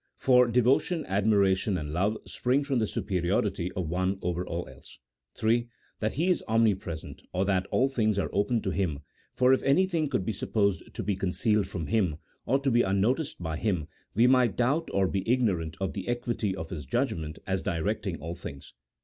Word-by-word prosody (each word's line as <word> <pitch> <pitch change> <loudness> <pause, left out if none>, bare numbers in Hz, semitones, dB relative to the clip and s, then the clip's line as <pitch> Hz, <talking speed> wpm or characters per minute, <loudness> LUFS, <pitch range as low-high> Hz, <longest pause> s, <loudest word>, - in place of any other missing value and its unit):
For 125 -2 +5
devotion, 125 +8 +2
admiration, 100 -1 +2
and 75 -2 -5
love 100 +6 +1
spring 130 +3 0
from 140 -3 0
the 110 - +1
superiority 90 0 -1
of 90 -3 -3
one 95 +3 0
over 90 0 -1
all 85 -1 -4
else. 65 +1 -14 0.5
m. 120 +2 +2 0.3
That 110 0 -1
He 170 +6 +1
is 180 - 0
omnipresent, 105 -8 0
or 95 +2 +1
that 95 -1 +1
all 130 - +2
things 110 -6 0
are 100 - -1
open, 105 +3 +1
to 95 - -1
Him, 85 -7 -1 0.3
for 130 +1 +5
if 130 - +2
anything 165 +1 +2
could 125 -9 -1
be 110 - -1
supposed 100 0 -1
to - - -3
be 105 - 0
concealed 100 +2 +1
from 85 -4 -4
Him, 95 -7 +1 0.3
or 130 - +3
to 135 -1 +1
be 120 0 +4
unnoticed 105 - 0
by 80 -2 -2
Him, 90 -8 -1 0.3
we 115 +3 +5
might 125 -5 +4
doubt 145 +7 +1
or 95 -1 +2
be 95 +1 -1
ignorant 95 -11 0
of 95 -1 -2
the 95 -3 -5
equity 120 -5 -1
of 80 -4 -7
His 75 -6 -6
judgment 80 +3 -1
as 95 -1 -1
directing 95 +1 -2
all 80 +3 -5
things. 70 -5 -9
100 Hz, 190 wpm, -28 LUFS, 90-120 Hz, 0.5 s, For